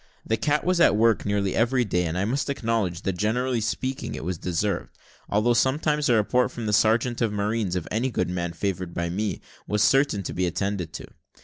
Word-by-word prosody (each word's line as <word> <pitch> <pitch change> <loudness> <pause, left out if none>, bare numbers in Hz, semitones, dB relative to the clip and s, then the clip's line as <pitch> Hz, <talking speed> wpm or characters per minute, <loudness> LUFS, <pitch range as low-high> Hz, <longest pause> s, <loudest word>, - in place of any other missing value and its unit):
The 110 - +1
cat 145 +6 0
was 180 -1 +1
at 170 - +5
work 115 -1 +2
nearly 100 -2 0
every 125 +2 +2
day, 90 -3 0
and 80 +2 -3
I 95 - 0
must 135 +6 -1
acknowledge 115 -10 -1
that, 95 -2 -2
generally 120 +4 0
speaking, 130 +4 -3
it - - -6
was 90 -1 -3
deserved; 90 +2 -2 0.3
although 105 +4 +2
sometimes 150 +4 +1
a 120 - +5
report 125 +4 +2
from 120 - -6
the 105 - -1
sergeant 115 +3 +2
of 115 -2 +2
marines 105 -2 -1
of 90 -3 -3
any 115 +5 0
good 105 - -1
man 85 -1 -3
favoured 90 0 -3
by 85 0 -1
me, 105 +3 -2 0.3
was 105 0 +1
certain 135 -4 +3
to - - -5
be 90 0 0
attended 95 -1 -2
to. - - -7
105 Hz, 210 wpm, -25 LUFS, 95-120 Hz, 0.3 s, at